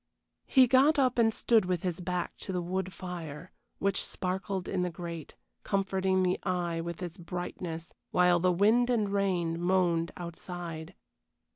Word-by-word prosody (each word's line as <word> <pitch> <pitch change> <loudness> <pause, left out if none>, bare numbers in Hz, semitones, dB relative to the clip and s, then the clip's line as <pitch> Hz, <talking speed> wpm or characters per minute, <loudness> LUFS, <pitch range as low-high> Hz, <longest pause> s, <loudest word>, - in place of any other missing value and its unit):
He 260 -1 +7
got 270 +5 +5
up 255 -3 +3
and 225 -1 +5
stood 220 -2 +3
with 180 -2 -1
his 180 -2 -2
back 180 0 -2
to - - -6
the 180 - -1
wood 185 +2 -2
fire, 170 -3 -7 0.3
which 195 -1 0
sparkled 190 0 -3
in 190 - -1
the 180 - 0
grate, 170 -2 -7 0.3
comforting 190 -1 +1
the 180 0 +1
eye 175 -2 -1
with 170 +1 -5
its 175 +2 -6
brightness, 170 -1 -5 0.2
while 180 -1 +4
the 180 +1 +3
wind 220 +7 +4
and 220 -5 +2
rain 175 -4 0
moaned 175 -2 +2
outside. 170 -2 -6
180 Hz, 155 wpm, -30 LUFS, 170-195 Hz, 0.3 s, He